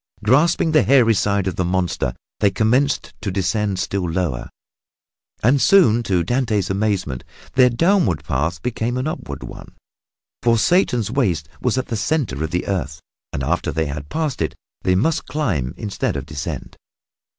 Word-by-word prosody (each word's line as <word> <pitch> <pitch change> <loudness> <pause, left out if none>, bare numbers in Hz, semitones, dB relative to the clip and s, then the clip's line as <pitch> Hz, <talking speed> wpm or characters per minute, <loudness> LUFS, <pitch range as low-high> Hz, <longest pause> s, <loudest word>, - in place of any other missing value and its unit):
Grasping 155 +8 +3
the 155 - +5
hairy 125 -4 +5
side 100 -2 +1
of 95 - -3
the 90 - +1
monster, 90 -8 -1 0.2
they 100 - +4
commenced 125 +7 +1
to 110 - -2
descend 100 +1 0
still 95 -1 -2
lower. 80 -7 -2 0.9
And 130 +5 +4
soon, 165 - +5
to 95 -6 +1
Dante's 110 -1 0
amazement, 95 - -1 0.3
their 130 -1 +6
downward 125 - +2
path 80 +3 -2
became 120 0 -2
an 130 - -2
upward 155 - -5
one, - - -10 0.7
for 115 -1 +3
Satan's 120 - +2
waist 95 - 0
was 125 0 +1
at 130 - -2
the 115 - -1
center 110 - -1
of 80 - -2
the 90 +1 -2
earth 75 -7 -3 0.3
and 65 - -3
after 80 +6 0
they 80 0 0
had 75 0 -6
passed 155 - -2
it 80 - -1 0.3
they 90 - +2
must 155 - +1
climb 90 - -1
instead 105 -3 -2
of - - -4
descend. 75 -1 -6
105 Hz, 160 wpm, -21 LUFS, 85-125 Hz, 0.9 s, their